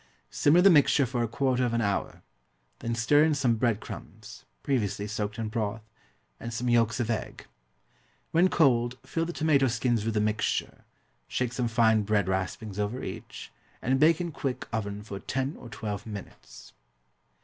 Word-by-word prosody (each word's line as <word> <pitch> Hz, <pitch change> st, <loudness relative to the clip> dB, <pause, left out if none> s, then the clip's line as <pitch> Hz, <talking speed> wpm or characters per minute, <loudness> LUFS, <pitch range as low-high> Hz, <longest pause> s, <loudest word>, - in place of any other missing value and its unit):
Simmer 160 Hz, +5 st, +4 dB
the 195 Hz, +1 st, +7 dB
mixture 145 Hz, -2 st, +5 dB
for 125 Hz, 0 st, -2 dB
a 120 Hz, -, +1 dB
quarter 130 Hz, +2 st, 0 dB
of 120 Hz, -2 st, 0 dB
an 115 Hz, -, +1 dB
hour, 100 Hz, -2 st, -2 dB, 0.6 s
then 115 Hz, 0 st, -2 dB
stir 145 Hz, +6 st, +4 dB
in 155 Hz, -1 st, +3 dB
some 130 Hz, -4 st, +2 dB
bread 115 Hz, -2 st, +1 dB
crumbs, -, -, -10 dB, 0.2 s
previously 105 Hz, -7 st, -1 dB
soaked 105 Hz, -1 st, -3 dB
in 110 Hz, -1 st, -2 dB
broth, 110 Hz, 0 st, -3 dB, 0.6 s
and 115 Hz, -, -6 dB
some 120 Hz, +2 st, -3 dB
yolks 115 Hz, 0 st, +2 dB
of 120 Hz, -1 st, 0 dB
egg. 110 Hz, -, -4 dB, 0.9 s
When 175 Hz, +3 st, +4 dB
cold, 125 Hz, -6 st, +2 dB
fill 165 Hz, 0 st, -1 dB
the 175 Hz, -, -4 dB
tomato 150 Hz, -5 st, +2 dB
skins 120 Hz, -1 st, 0 dB
with 110 Hz, 0 st, -2 dB
the -, -, +3 dB
mixture, 110 Hz, +1 st, -1 dB, 0.4 s
shake 125 Hz, -1 st, -2 dB
some 120 Hz, -1 st, -1 dB
fine 110 Hz, -1 st, +3 dB
bread 105 Hz, -2 st, +1 dB
raspings 95 Hz, +2 st, -3 dB
over 105 Hz, +5 st, -2 dB
each, -, -, -8 dB, 0.3 s
and 130 Hz, +2 st, +1 dB
bake 155 Hz, +2 st, +5 dB
in 175 Hz, -1 st, -3 dB
quick 135 Hz, -3 st, -4 dB
oven 105 Hz, -2 st, -3 dB
for 100 Hz, -2 st, -7 dB
ten 130 Hz, +7 st, -2 dB
or 120 Hz, -, -11 dB
twelve 110 Hz, -3 st, -5 dB
minutes. 105 Hz, -3 st, -10 dB
115 Hz, 170 wpm, -28 LUFS, 105-135 Hz, 0.9 s, the